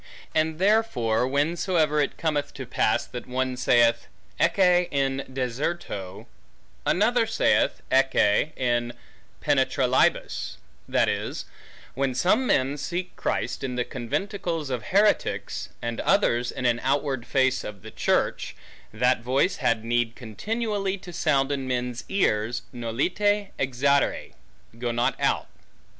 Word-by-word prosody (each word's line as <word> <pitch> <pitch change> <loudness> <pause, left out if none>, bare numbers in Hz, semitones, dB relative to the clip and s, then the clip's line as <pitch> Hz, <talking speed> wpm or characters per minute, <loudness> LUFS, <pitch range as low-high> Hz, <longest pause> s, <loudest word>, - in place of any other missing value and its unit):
And 155 0 +1
therefore, 180 - +2
whensoever 155 +2 +1
it 145 - -2
cometh 150 -3 -1
to - - -6
that - - -25
pass, - - +1
that 125 -1 -8
one 130 0 -1
saith, 120 -1 +3 0.3
Ecce 180 -2 +4
in 135 -2 0
deserto, 125 - -4 0.6
another - - +3
saith, - - +2
Ecce 135 0 +3
in 120 -1 0 0.5
penetralibus; - - +1 0.3
that - - +3
is, - - -3 0.5
when 135 -1 -1
some 215 - +2
men 140 - +1
seek 180 +4 -4
Christ, - - -2
in 130 -2 -3
the 125 -1 -1
conventicles 150 - -3
of 120 -4 -3
heretics, 205 +2 +1
and 120 0 -3
others, 125 -12 +2
in 125 - -5
an 120 -1 +2
outward 135 -2 -1
face 130 -1 +2
of 100 -3 -8
a - - -8
church, - - 0 0.4
that 125 +2 +2
voice 135 +9 +1
had 115 -1 0
need 120 0 0
continually 200 - -3
to 180 -2 -11
sound 140 -4 +1
in 135 -2 -2
men's 125 -1 -2
ears, 120 - 0
Nolite 185 - 0
exire, 135 +2 +1 0.5
Go 120 -1 -1
not 120 +1 +1
out. - - +1
135 Hz, 125 wpm, -25 LUFS, 120-170 Hz, 0.6 s, Ecce